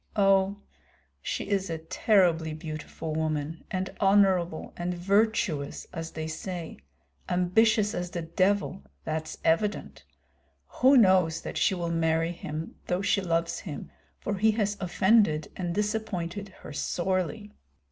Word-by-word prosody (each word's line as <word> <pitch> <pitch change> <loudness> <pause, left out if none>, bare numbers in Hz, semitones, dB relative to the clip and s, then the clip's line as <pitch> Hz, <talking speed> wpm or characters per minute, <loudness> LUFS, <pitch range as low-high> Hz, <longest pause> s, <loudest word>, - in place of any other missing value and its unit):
Oh, 195 -1 +3 0.6
she - - -3
is 195 -2 0
a 165 - -2
terribly 165 -2 +2
beautiful 155 0 -6
woman, 155 0 -2
and 185 0 -2
honorable 190 -4 +3
and 175 +1 -3
virtuous, 190 -6 +1
as 165 -1 -5
they 160 0 -4
say; 170 +1 -5 0.5
ambitious 210 +4 +3
as 175 -3 -3
the 175 -1 -4
devil, 185 - 0 0.2
that's 155 0 -3
evident. 165 - 0 0.8
Who 265 +2 +7
knows 185 -7 +4
that - - -6
she 195 - +3
will 170 -1 -2
marry 165 0 +1
him 160 -2 -6
though 180 +2 0
she 200 0 +2
loves 170 -2 0
him, 150 -6 -7 0.3
for 205 - -3
he 220 +2 +4
has 210 -2 0
offended 190 -4 +3
and 175 -2 -3
disappointed 205 -3 -2
her - - -8
sorely. 185 +6 -2
180 Hz, 130 wpm, -28 LUFS, 160-200 Hz, 0.8 s, Who